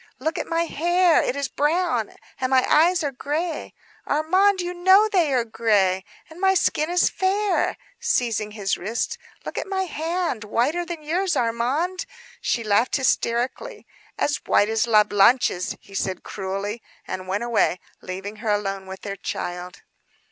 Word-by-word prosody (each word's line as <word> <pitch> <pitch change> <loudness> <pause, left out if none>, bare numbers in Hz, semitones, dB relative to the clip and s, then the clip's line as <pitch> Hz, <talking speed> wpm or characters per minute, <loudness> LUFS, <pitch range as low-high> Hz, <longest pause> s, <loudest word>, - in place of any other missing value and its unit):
Look 315 +5 -2
at - - -4
my 335 0 +1
hair, 345 +1 +3
it 250 - -1
is 280 -1 -1
brown; 295 - 0 0.2
and 255 - 0
my 260 -1 +4
eyes 335 +2 +4
are 285 - -1
gray, 305 +5 -3 0.3
Armand, 370 +7 +3
you 355 0 -2
know 375 +4 +5
they 355 -8 +2
are 250 -3 +2
gray. 200 -5 +1 0.2
And 325 +3 -13
my 385 0 +4
skin 310 -3 +1
is 355 0 +3
fair," 395 +1 0 0.2
seizing 230 - 0
his 205 -2 -2
wrist. 230 - -3 0.3
"Look - - -4
at - - -5
my 385 -1 -1
hand; 330 - -2
whiter 290 +11 0
than 335 -3 -6
yours, 355 +4 0
Armand," 255 +11 -1 0.3
she 235 - 0
laughed 215 +3 +2
hysterically. 260 - -1 0.3
"As 290 - +1
white 205 - +4
as 225 +1 +1
La 215 -2 +6
Blanche's," 205 -2 +3
he - - -20
returned 190 -2 -2
cruelly; 195 +3 -4 0.3
and 185 0 -5
went 200 +4 -1
away 230 -6 +1 0.2
leaving 195 +3 -6
her 220 0 -4
alone 195 -2 -1
with 190 0 -8
their 200 -1 -5
child. 180 0 -5
260 Hz, 160 wpm, -23 LUFS, 210-350 Hz, 0.3 s, La